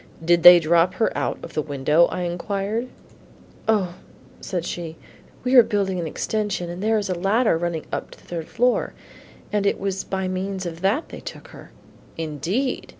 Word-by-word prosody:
"Did 170 Hz, 0 st, +4 dB
they 175 Hz, +1 st, +11 dB
drop 170 Hz, +2 st, +3 dB
her 225 Hz, -, 0 dB
out -, -, -1 dB
of -, -, -9 dB
the 155 Hz, -, 0 dB
window?" 150 Hz, +3 st, +3 dB
I 180 Hz, -, -4 dB
inquired. 200 Hz, +6 st, -2 dB, 0.8 s
"O," 200 Hz, -5 st, +2 dB, 0.5 s
said 180 Hz, -3 st, -4 dB
she, 165 Hz, -2 st, -5 dB, 0.5 s
"we 250 Hz, +1 st, 0 dB
are 250 Hz, -, +10 dB
building 195 Hz, -4 st, -1 dB
an 165 Hz, -, -2 dB
extension, 205 Hz, -1 st, -2 dB
and 175 Hz, +2 st, -7 dB
there 220 Hz, +1 st, +2 dB
is 205 Hz, -, -1 dB
a 185 Hz, -, 0 dB
ladder 195 Hz, +5 st, +2 dB
running 165 Hz, -1 st, -2 dB
up -, -, -3 dB
to -, -, -14 dB
the -, -, -22 dB
third 165 Hz, -2 st, -5 dB
floor, 245 Hz, +2 st, +1 dB, 0.6 s
and 205 Hz, -1 st, +1 dB
it -, -, +1 dB
was 195 Hz, -1 st, -2 dB
by 190 Hz, -1 st, -3 dB
means 190 Hz, +1 st, -3 dB
of 170 Hz, -1 st, -6 dB
that 205 Hz, -, 0 dB
they -, -, -8 dB
took -, -, -9 dB
her." -, -, -13 dB, 0.5 s
"Indeed! 165 Hz, -, -2 dB
185 Hz, 185 wpm, -23 LUFS, 170-205 Hz, 0.8 s, they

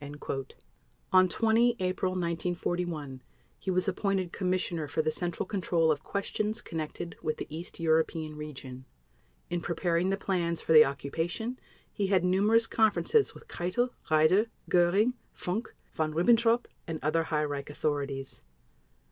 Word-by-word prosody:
On 185 Hz, 0 st, +6 dB
20 230 Hz, +3 st, +3 dB
April 185 Hz, 0 st, 0 dB
1941 170 Hz, -5 st, -2 dB, 0.4 s
he -, -, -5 dB
was 185 Hz, +1 st, +1 dB
appointed 195 Hz, -2 st, 0 dB
Commissioner 180 Hz, -4 st, -1 dB
for 155 Hz, +2 st, -1 dB
the 155 Hz, -, +1 dB
Central 175 Hz, +3 st, -2 dB
Control 175 Hz, -5 st, +1 dB
of 150 Hz, -1 st, -1 dB
Questions 210 Hz, +4 st, -2 dB
Connected 165 Hz, +1 st, -5 dB
with 155 Hz, -1 st, -2 dB
the -, -, -4 dB
East 170 Hz, +2 st, -7 dB
European 160 Hz, -1 st, +1 dB
Region. 135 Hz, -4 st, -8 dB, 0.7 s
In 175 Hz, -1 st, -1 dB
preparing 170 Hz, +1 st, 0 dB
the 195 Hz, -, +1 dB
plans 170 Hz, -4 st, -1 dB
for 160 Hz, -, +1 dB
the 155 Hz, -1 st, +10 dB
occupation, 170 Hz, -, -3 dB, 0.3 s
he 200 Hz, -, 0 dB
had 190 Hz, -2 st, +3 dB
numerous 210 Hz, +5 st, +4 dB
conferences 220 Hz, -, +2 dB
with -, -, -14 dB
Keitel, 240 Hz, -, -1 dB, 0.2 s
Raeder, 160 Hz, +8 st, +4 dB, 0.2 s
Göring, 185 Hz, +7 st, +4 dB, 0.2 s
Funk, 205 Hz, +6 st, -3 dB, 0.2 s
Von 155 Hz, -1 st, -1 dB
Ribbentrop, 230 Hz, +6 st, +4 dB, 0.2 s
and 165 Hz, -, -3 dB
other 165 Hz, +2 st, +1 dB
high 150 Hz, -1 st, 0 dB
Reich 145 Hz, -1 st, -4 dB
authorities. 140 Hz, -2 st, -3 dB
175 Hz, 135 wpm, -29 LUFS, 155-195 Hz, 0.7 s, the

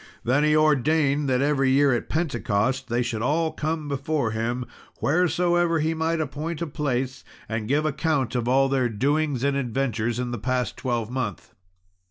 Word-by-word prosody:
Then 130 Hz, +5 st, +2 dB
he 150 Hz, 0 st, +3 dB
ordained 150 Hz, -1 st, +2 dB
that, 130 Hz, +1 st, +2 dB
every 140 Hz, -2 st, +2 dB
year 140 Hz, 0 st, +4 dB
at 120 Hz, -, -2 dB
Pentecost, 130 Hz, -5 st, -1 dB
they 120 Hz, +1 st, +1 dB
should 115 Hz, -3 st, -3 dB
all 160 Hz, +6 st, +1 dB
come 155 Hz, 0 st, -3 dB
before 140 Hz, -3 st, -1 dB
him, 120 Hz, +3 st, -2 dB, 0.3 s
wheresoever 175 Hz, +1 st, +2 dB
he 160 Hz, +1 st, 0 dB
might 160 Hz, +1 st, -1 dB
appoint 155 Hz, +2 st, -3 dB
a 170 Hz, -, -1 dB
place, 135 Hz, -4 st, -2 dB, 0.2 s
and 110 Hz, -1 st, -3 dB
give 145 Hz, +5 st, +1 dB
account 150 Hz, -3 st, 0 dB
of 120 Hz, -2 st, -1 dB
all 135 Hz, +2 st, +4 dB
their 130 Hz, -2 st, +1 dB
doings 140 Hz, +4 st, 0 dB
and 140 Hz, 0 st, +1 dB
adventures 120 Hz, -3 st, -1 dB
of 125 Hz, -1 st, -2 dB
the 120 Hz, -, -4 dB
past 125 Hz, +3 st, -1 dB
twelvemonth. 120 Hz, -3 st, -3 dB
135 Hz, 165 wpm, -25 LUFS, 125-155 Hz, 0.3 s, year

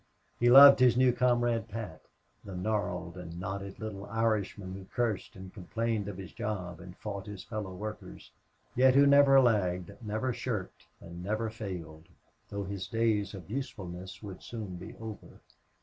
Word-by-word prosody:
He 120 Hz, -, +4 dB
loved 140 Hz, +2 st, +10 dB
his 125 Hz, -2 st, +5 dB
new 130 Hz, -1 st, +5 dB
comrade, 120 Hz, -2 st, +1 dB
Pat, 105 Hz, -7 st, -6 dB, 0.4 s
the 95 Hz, -2 st, -8 dB
gnarled 90 Hz, -3 st, -2 dB
and 85 Hz, -1 st, -8 dB
knotted 95 Hz, +1 st, -5 dB
little 105 Hz, -2 st, -6 dB
Irishman 105 Hz, -3 st, -1 dB
who 95 Hz, 0 st, -8 dB
cursed 115 Hz, -2 st, -2 dB
and 95 Hz, 0 st, -10 dB
complained 110 Hz, +2 st, -2 dB
of 100 Hz, -3 st, -6 dB
his 95 Hz, -3 st, -8 dB
job 90 Hz, -6 st, -4 dB
and 90 Hz, +1 st, -11 dB
fought 100 Hz, -2 st, -6 dB
his 105 Hz, -2 st, -7 dB
fellow 105 Hz, -4 st, -5 dB
workers, 105 Hz, +3 st, -8 dB, 0.4 s
yet 130 Hz, +1 st, +5 dB
who 140 Hz, +1 st, +7 dB
never 140 Hz, -1 st, +7 dB
lagged, 100 Hz, -7 st, +2 dB
never 110 Hz, +4 st, -2 dB
shirked, 110 Hz, -6 st, -5 dB
and 85 Hz, +1 st, -9 dB
never 110 Hz, +3 st, -1 dB
failed, 85 Hz, -7 st, -7 dB, 0.4 s
though 100 Hz, 0 st, -3 dB
his 95 Hz, -1 st, -5 dB
days 110 Hz, -3 st, 0 dB
of 90 Hz, -4 st, -10 dB
usefulness 95 Hz, -6 st, -6 dB
must 100 Hz, -3 st, -8 dB
soon 105 Hz, -6 st, -6 dB
be 90 Hz, -, -9 dB
over. 110 Hz, -2 st, -9 dB
105 Hz, 160 wpm, -30 LUFS, 95-115 Hz, 0.4 s, loved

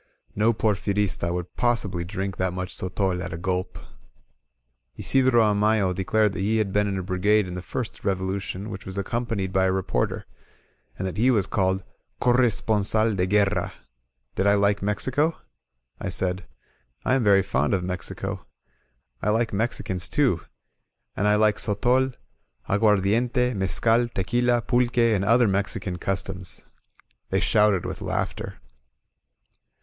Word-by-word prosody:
No 110 Hz, +3 st, +3 dB
Porfirista 100 Hz, -4 st, 0 dB
would 90 Hz, 0 st, -5 dB
possibly 110 Hz, -8 st, 0 dB
drink 95 Hz, +1 st, -4 dB
that 95 Hz, -1 st, -1 dB
much 90 Hz, 0 st, -4 dB
goiol 95 Hz, 0 st, -2 dB
at 90 Hz, -, -5 dB
a -, -, -4 dB
gulp. 90 Hz, +1 st, -2 dB, 1.2 s
Isidro 130 Hz, -, +3 dB
Amayo 105 Hz, -2 st, +2 dB
declared 105 Hz, +3 st, +1 dB
that 90 Hz, -, -5 dB
he 105 Hz, +3 st, +1 dB
had 105 Hz, -3 st, -1 dB
been 105 Hz, 0 st, +2 dB
in 100 Hz, -1 st, -2 dB
a 95 Hz, -, -3 dB
brigade 100 Hz, +3 st, +2 dB
in 90 Hz, -, -6 dB
the 90 Hz, -, -5 dB
first 120 Hz, +4 st, -5 dB
Revolution 95 Hz, +1 st, -2 dB
which 95 Hz, 0 st, -7 dB
was 95 Hz, +1 st, -7 dB
accom 115 Hz, +5 st, -2 dB
panied 100 Hz, -5 st, -2 dB
by 95 Hz, 0 st, +3 dB
a 95 Hz, -, +2 dB
reporter, 95 Hz, -1 st, -1 dB, 0.7 s
and 95 Hz, -, -3 dB
that 95 Hz, -, -5 dB
he 120 Hz, +4 st, +3 dB
was 105 Hz, -7 st, +3 dB
called 95 Hz, -2 st, 0 dB, 0.4 s
Corre 125 Hz, 0 st, +4 dB
sponsal 110 Hz, +1 st, +1 dB
de 90 Hz, -1 st, 0 dB
Guerra, 100 Hz, -2 st, +1 dB, 0.6 s
Did 95 Hz, -, 0 dB
I 100 Hz, -, +5 dB
like 100 Hz, 0 st, +2 dB
Mexico? 130 Hz, +10 st, 0 dB, 0.6 s
I -, -, -3 dB
said: 90 Hz, 0 st, -2 dB, 0.6 s
^'I -, -, +2 dB
am 130 Hz, -, 0 dB
very 100 Hz, -2 st, +5 dB
fond 75 Hz, +5 st, +1 dB
of 90 Hz, -, -2 dB
Mexico. 90 Hz, 0 st, -5 dB, 0.7 s
I 105 Hz, -, 0 dB
like 115 Hz, +1 st, +1 dB
Mexicans 100 Hz, -4 st, -1 dB
too. -, -, +2 dB, 0.7 s
And 105 Hz, -, 0 dB
I 105 Hz, -, +4 dB
like 105 Hz, 0 st, +3 dB
sotol^ 125 Hz, +5 st, +1 dB, 0.5 s
aguardiente^ 110 Hz, +5 st, +2 dB
mescal, 115 Hz, +5 st, +2 dB
tequila, 120 Hz, +4 st, +1 dB
pulque, 120 Hz, -1 st, +1 dB, 0.2 s
and 100 Hz, -2 st, +1 dB
other 115 Hz, +3 st, +4 dB
Mexican 100 Hz, -1 st, -1 dB
customs 95 Hz, -2 st, -4 dB, 0.3 s
!" -, -, -35 dB
They 95 Hz, -, +1 dB
shouted 105 Hz, -1 st, +3 dB
with -, -, -5 dB
laughter. -, -, -3 dB
100 Hz, 150 wpm, -25 LUFS, 95-110 Hz, 1.2 s, I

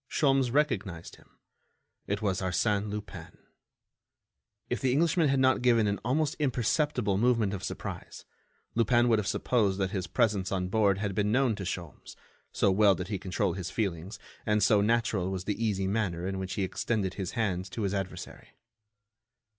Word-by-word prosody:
Sholmes 135 Hz, -4 st, +2 dB
recognized 100 Hz, -, -1 dB
him—it 100 Hz, +1 st, -10 dB
was 95 Hz, -3 st, 0 dB
Arsène 100 Hz, +3 st, 0 dB
Lupin. 105 Hz, 0 st, -7 dB, 1.3 s
If 125 Hz, -, -3 dB
the 130 Hz, -, +2 dB
Englishman 160 Hz, +2 st, +3 dB
had 135 Hz, 0 st, +2 dB
not 130 Hz, -1 st, +3 dB
given 120 Hz, -3 st, +4 dB
an 100 Hz, -1 st, 0 dB
almost 150 Hz, +6 st, 0 dB
imperceptible 125 Hz, -5 st, +1 dB
movement 115 Hz, -4 st, +2 dB
of 95 Hz, -1 st, -5 dB
surprise, -, -, -6 dB, 0.5 s
Lupin 120 Hz, +1 st, +3 dB
would 110 Hz, -2 st, +4 dB
have 100 Hz, -, -3 dB
supposed 105 Hz, -6 st, +1 dB
that 95 Hz, -2 st, -1 dB
his 95 Hz, -3 st, -3 dB
presence 105 Hz, -6 st, +1 dB
on 90 Hz, -2 st, -1 dB
board 100 Hz, -2 st, +2 dB
had 100 Hz, -1 st, -2 dB
been 105 Hz, +2 st, 0 dB
known 130 Hz, 0 st, +3 dB
to 95 Hz, -, -6 dB
Sholmes, 85 Hz, -3 st, -6 dB, 0.4 s
so 100 Hz, -, +2 dB
well 100 Hz, 0 st, +5 dB
did 90 Hz, +2 st, -6 dB
he 100 Hz, -3 st, -2 dB
control 95 Hz, 0 st, -1 dB
his 90 Hz, -1 st, -5 dB
feelings 95 Hz, -1 st, -3 dB, 0.3 s
and 105 Hz, 0 st, +1 dB
so 105 Hz, -2 st, +4 dB
natural 110 Hz, -4 st, +1 dB
was 95 Hz, -1 st, -3 dB
the 105 Hz, +3 st, -2 dB
easy 100 Hz, -3 st, 0 dB
manner 95 Hz, -4 st, -1 dB
in 95 Hz, 0 st, -3 dB
which 95 Hz, 0 st, -4 dB
he 100 Hz, -, -1 dB
extended 95 Hz, +1 st, -1 dB
his 95 Hz, -3 st, -5 dB
hand 95 Hz, -5 st, -1 dB
to 110 Hz, +3 st, -4 dB
his 100 Hz, -1 st, -1 dB
adversary. 95 Hz, -2 st, -6 dB
105 Hz, 170 wpm, -29 LUFS, 95-120 Hz, 1.3 s, well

